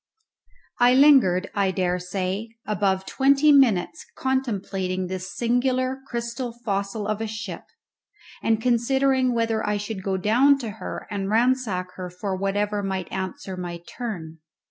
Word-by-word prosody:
I 245 +1 +6
lingered, 255 -10 +5
I 200 -2 +1
daresay, 185 +2 -2 0.2
above 195 -2 0
twenty 280 +5 +4
minutes 270 - +3
contemplating 195 -8 -1
this 185 +1 -5
singular 255 +2 +1
crystal 235 0 -4
fossil 200 0 -2
of 215 0 -2
a 225 - -2
ship, 215 -5 -6 0.8
and 225 -1 +2
considering 255 +2 +2
whether 225 -1 0
I 210 0 0
should 205 -1 -5
go 190 0 -1
down 245 +9 +4
to 235 -5 -5
her - - -5
and 195 -1 -2
ransack 220 -6 +1
her 180 -1 -5
for 190 +2 -4
whatever 205 +2 -1
might 190 -2 -3
answer 190 0 -4
my 175 -1 -5
turn. 170 -10 -6
210 Hz, 135 wpm, -24 LUFS, 190-245 Hz, 0.8 s, I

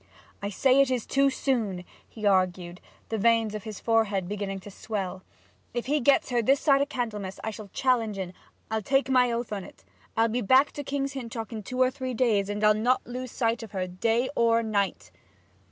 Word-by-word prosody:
'I 200 - -2
say 260 +6 +4
it 275 - +3
is 250 -3 -1
too 275 0 +3
soon!' 225 -9 -1 0.2
he 215 -2 -7
argued, 180 -2 +1 0.3
the 225 - -2
veins 225 0 +3
of 215 +1 -6
his 215 -2 -6
forehead 210 -5 +1
beginning 200 -1 -4
to 205 - -10
swell. 195 -3 -4 0.5
'If 240 - -2
he 295 +4 +1
gets 275 0 +3
her 240 -1 +2
this 270 +5 +3
side 275 -2 +4
o' 280 - +1
Candlemas 210 -8 -4
I'll 215 -1 -5
challenge 230 -6 +1
en 185 -2 -5 0.4
I'll 220 0 0
take 270 +4 +1
my 250 -2 +4
oath 235 -1 -3
on't! 195 -3 -8 0.3
I'll 225 0 +4
be 235 +2 -1
back 260 +7 +4
to 290 - -6
King's 275 0 -2
Hintock 230 -4 -6
in 220 - -4
two 250 +6 -6
or 255 0 +4
three 260 -2 -4
days, 215 -5 +2
and 205 +1 -3
I'll 210 0 +6
not 240 +4 +1
lose 250 +1 -5
sight 230 0 0
of 220 -2 -10
her 185 -2 -1
day 225 +7 0
or 230 0 +3
night!' 205 -3 -1
225 Hz, 200 wpm, -27 LUFS, 205-255 Hz, 0.5 s, I'll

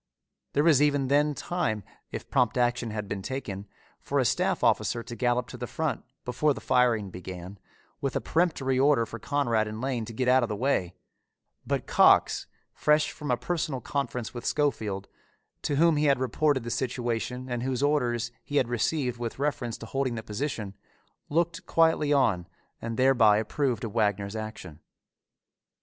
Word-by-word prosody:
There 145 - +3
was 155 -4 +5
even 145 -3 +2
then 145 +1 +3
time, 115 - -2 0.3
if - - -6
prompt 125 0 +2
action 120 -1 +1
had 105 -1 -4
been 100 -1 -4
taken, 105 -5 -5 0.3
for - - -2
a - - +3
staff - - +1
officer 115 - +2
to 120 +1 -8
gallop 120 +1 +1
to - - -8
the - - -5
front, - - -2 0.2
before 140 +4 +1
the - - -6
firing 120 -6 +2
began, 90 +1 -8 0.4
with 135 -2 -2
a - - +2
peremptory 145 -6 +1
order 135 -4 +4
for 115 - -8
Conrad 120 -7 +1
and 110 +1 -6
Lane 125 -3 -2
to 115 - -8
get 125 +3 -1
out 130 +1 +5
of 120 - -1
the 105 - -2
way; 100 -7 0 0.7
but - - -1
Cox, - - +4 0.3
fresh 150 0 +2
from 150 - -7
a 125 - +2
personal 155 0 -2
conference 125 -4 -3
with 120 - -6
Schofield, 110 -10 -1 0.5
to 145 - -1
whom 165 +1 +4
he 150 - +2
had 140 -2 +4
reported 130 +1 +1
the 120 - -4
situation 125 0 -2
and 120 -2 -3
whose 130 +1 -1
orders 125 -5 +1
he 145 - -6
had 125 -4 +2
received 125 +1 0
with 120 -1 -4
reference 135 -5 -2
to - - -9
holding 130 0 -1
the 115 - -5
position, 110 -3 -4 0.6
looked 170 +3 0
quietly 160 -3 +3
on 110 -12 +2 0.3
and 115 0 -4
thereby 125 -5 +5
approved 125 +3 -1
of 110 -3 -4
Wagner's 100 0 0
action. 110 -8 -7
125 Hz, 175 wpm, -27 LUFS, 110-145 Hz, 0.7 s, was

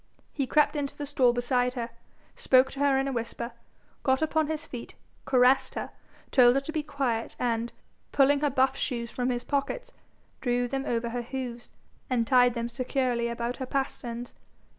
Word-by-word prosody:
He 275 -3 -1
crept 300 +3 +3
into 285 -2 -3
the 290 - -4
stall 265 -4 +3
beside 245 +1 +1
her, 235 -2 -4 0.4
spoke 260 0 +4
to 275 - -8
her 280 -1 +3
in 270 +1 +1
a - - -1
whisper, 235 0 -4 0.5
got 265 +2 +2
upon 315 -1 +1
his 315 -1 -3
feet, 240 -2 -8 0.3
caressed 260 +1 +4
her, - - -4 0.4
told 245 -2 +6
her - - +4
to 275 - -6
be 315 -1 -1
quiet, 275 -6 -2
and, 235 -1 -1 0.4
pulling 280 0 +4
her 295 0 +2
buff 265 0 +2
shoes 235 -4 -2
from 250 0 -1
his 245 -1 -1
pockets, 285 - -2 0.5
drew 245 0 +1
them 270 +2 -3
over 235 0 -1
her 245 +1 -3
hoofs, 245 -1 -6 0.4
and 240 -3 +1
tied 245 -1 +4
them 235 0 -2
securely 245 0 -1
about 235 +1 -3
her 260 - -4
pasterns. 245 -3 -3
255 Hz, 180 wpm, -28 LUFS, 240-275 Hz, 0.5 s, told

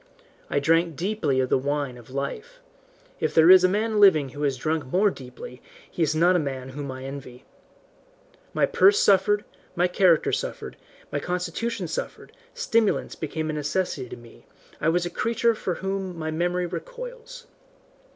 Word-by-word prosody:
I - - -1
drank 165 +2 +2
deeply 175 -6 -1
of 130 - -1
the - - +3
wine 140 -1 -2
of 120 -1 -14
life 430 - -5 0.6
if - - -1
there 165 +2 +7
is 185 -1 +8
a 185 - +5
man 215 +2 0
living 160 -9 +6
who 145 +3 -9
has 140 -3 0
drunk 155 +2 -2
more 195 +8 +2
deeply 125 -2 -11 0.3
he - - -5
is 155 -1 +2
not 175 +3 +4
a - - +3
man 135 -3 -4
whom 140 0 -6
I 130 0 -8
envy. 135 -2 -9 1.1
My - - +2
purse 405 +2 +4
suffered, 205 +1 +3 0.3
my 175 +1 +3
character 180 -2 +3
suffered, - - -4 0.4
my 145 - -1
constitution 180 +5 -3
suffered, 160 - -6 0.2
stimulants 230 - +1
became 155 0 -4
a - - -5
necessity 150 -3 -2
to - - -8
me, 120 -1 -17 0.3
I 155 - +1
was 175 +1 +1
a 175 - -4
creature 230 +4 +1
from 185 -5 -3
whom 190 -2 -4
my 160 -1 -3
memory 175 +2 0
recoils. - - -8
170 Hz, 170 wpm, -25 LUFS, 140-195 Hz, 1.1 s, is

